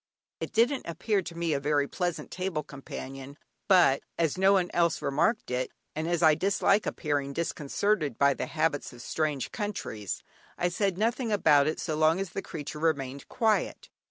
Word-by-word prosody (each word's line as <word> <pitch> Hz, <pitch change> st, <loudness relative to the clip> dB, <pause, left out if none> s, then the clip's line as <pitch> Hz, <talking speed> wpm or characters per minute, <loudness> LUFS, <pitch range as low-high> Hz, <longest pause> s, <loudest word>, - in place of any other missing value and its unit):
It -, -, -4 dB
didn't 245 Hz, +5 st, +2 dB
appear 195 Hz, +5 st, 0 dB
to 170 Hz, -2 st, -8 dB
me 170 Hz, -2 st, 0 dB
a 140 Hz, -, 0 dB
very 145 Hz, 0 st, +1 dB
pleasant 175 Hz, 0 st, -3 dB
table 180 Hz, -4 st, -2 dB
companion, 135 Hz, -1 st, -8 dB, 0.3 s
but 180 Hz, -9 st, +5 dB, 0.2 s
as 165 Hz, -3 st, +1 dB
no 190 Hz, +1 st, +4 dB
one 185 Hz, -2 st, +2 dB
else 170 Hz, -1 st, +2 dB
remarked 215 Hz, -, 0 dB
it, 125 Hz, 0 st, -1 dB, 0.3 s
and 155 Hz, +1 st, -2 dB
as 170 Hz, -1 st, 0 dB
I 160 Hz, -1 st, +7 dB
dislike 200 Hz, +4 st, +2 dB
appearing 145 Hz, -3 st, -1 dB
disconcerted 155 Hz, -, -1 dB
by 140 Hz, 0 st, +4 dB
the -, -, -4 dB
habits 155 Hz, -2 st, -1 dB
of 120 Hz, -1 st, -11 dB
strange 150 Hz, -3 st, -1 dB
countries, 180 Hz, -, -4 dB, 0.3 s
I 175 Hz, -, +1 dB
said 190 Hz, +1 st, 0 dB
nothing 230 Hz, +2 st, 0 dB
about 145 Hz, -8 st, +4 dB
it 155 Hz, -, -1 dB
so 155 Hz, -, -2 dB
long 155 Hz, +3 st, +3 dB
as 195 Hz, -3 st, -3 dB
the 195 Hz, -, -3 dB
creature 150 Hz, -3 st, -7 dB
remained 140 Hz, -4 st, -1 dB
quiet. 220 Hz, -2 st, 0 dB
160 Hz, 175 wpm, -28 LUFS, 145-190 Hz, 0.3 s, I